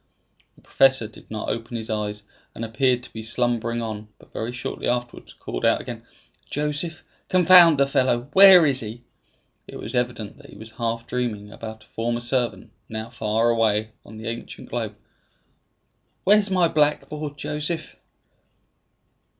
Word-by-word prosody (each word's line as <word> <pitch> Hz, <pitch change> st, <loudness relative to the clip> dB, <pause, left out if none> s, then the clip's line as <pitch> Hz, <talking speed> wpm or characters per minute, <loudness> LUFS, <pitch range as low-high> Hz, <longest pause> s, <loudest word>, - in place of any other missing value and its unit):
The -, -, -23 dB
professor 135 Hz, -4 st, +3 dB
did 110 Hz, -, -17 dB
not 110 Hz, -1 st, -4 dB
open 115 Hz, +1 st, -4 dB
his 110 Hz, 0 st, -5 dB
eyes, 105 Hz, -1 st, -3 dB, 0.3 s
and 115 Hz, -, -4 dB
appeared 125 Hz, +2 st, +1 dB
to 130 Hz, -, -11 dB
be 110 Hz, -, -6 dB
slumbering 115 Hz, 0 st, -1 dB
on, 110 Hz, -1 st, -5 dB
but -, -, -21 dB
very 115 Hz, +2 st, -3 dB
shortly 125 Hz, -, -5 dB
afterwards 120 Hz, 0 st, -3 dB
called -, -, -6 dB
out -, -, +3 dB
again, -, -, -7 dB, 0.4 s
"Joseph! 150 Hz, +3 st, -3 dB, 0.3 s
Confound 180 Hz, -3 st, +7 dB
the 140 Hz, -, +4 dB
fellow! 130 Hz, -3 st, +1 dB
where 190 Hz, -3 st, +9 dB
is 135 Hz, -3 st, +1 dB
he?" 115 Hz, +1 st, -8 dB, 0.6 s
It -, -, -10 dB
was 115 Hz, -, -7 dB
evident 120 Hz, -4 st, -2 dB
that -, -, -15 dB
he -, -, -13 dB
was 110 Hz, +1 st, -11 dB
half 115 Hz, 0 st, -3 dB
dreaming 110 Hz, -5 st, -3 dB
about 110 Hz, 0 st, -9 dB
a -, -, -24 dB
former 120 Hz, +1 st, -2 dB
servant 120 Hz, 0 st, -2 dB, 0.2 s
now 110 Hz, +1 st, -5 dB
far 115 Hz, 0 st, +1 dB
away 110 Hz, -1 st, +1 dB
on 110 Hz, -, -12 dB
the 110 Hz, -, -9 dB
ancient 115 Hz, +1 st, -7 dB
globe. 110 Hz, -3 st, -3 dB, 1.3 s
"Where's 205 Hz, +1 st, +5 dB
my 180 Hz, -3 st, +3 dB
blackboard, 150 Hz, -1 st, 0 dB
Joseph?" 150 Hz, +4 st, -3 dB
120 Hz, 155 wpm, -23 LUFS, 110-140 Hz, 1.3 s, where